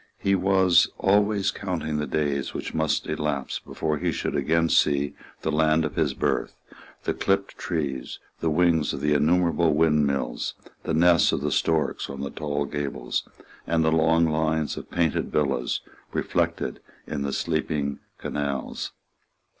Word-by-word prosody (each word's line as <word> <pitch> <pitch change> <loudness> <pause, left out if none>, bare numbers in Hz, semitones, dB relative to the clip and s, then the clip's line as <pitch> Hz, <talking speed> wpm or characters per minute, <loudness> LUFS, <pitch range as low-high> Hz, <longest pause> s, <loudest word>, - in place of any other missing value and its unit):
He 100 - +1
was 95 -2 +4
always 100 0 +2
counting 90 -7 -3
the 75 - -2
days 70 -3 -1
which - - -4
must 80 -1 0
elapse 75 -3 -2
before 75 -2 -3
he - - 0
should - - -2
again 85 +1 +2
see 70 -2 +2 0.3
the 80 - 0
land 80 +1 +3
of 75 - -4
his - - +1
birth, - - -1 0.5
the - - 0
clipped 95 0 0
trees, 70 -7 -3 0.2
the 80 - 0
wings 80 -1 +2
of 70 - -5
the 75 +1 +2
innumerable 85 +1 +3
windmills, 75 -5 +1 0.3
the - - 0
nests 85 +1 +5
of - - -1
the - - -1
storks 80 -3 0
on 70 -1 -6
the 70 - -4
tall 75 -2 -2
gables, 70 -4 -3 0.4
and 80 -1 +2
the 80 - +3
long 80 +1 +4
lines 80 0 0
of - - -8
painted 85 -3 0
villas 70 -5 0 0.3
reflected - - -1 0.3
in 75 - -4
the 70 0 -1
sleeping 75 -3 -1 0.2
canals. 70 -3 -3
80 Hz, 150 wpm, -25 LUFS, 75-85 Hz, 0.5 s, nests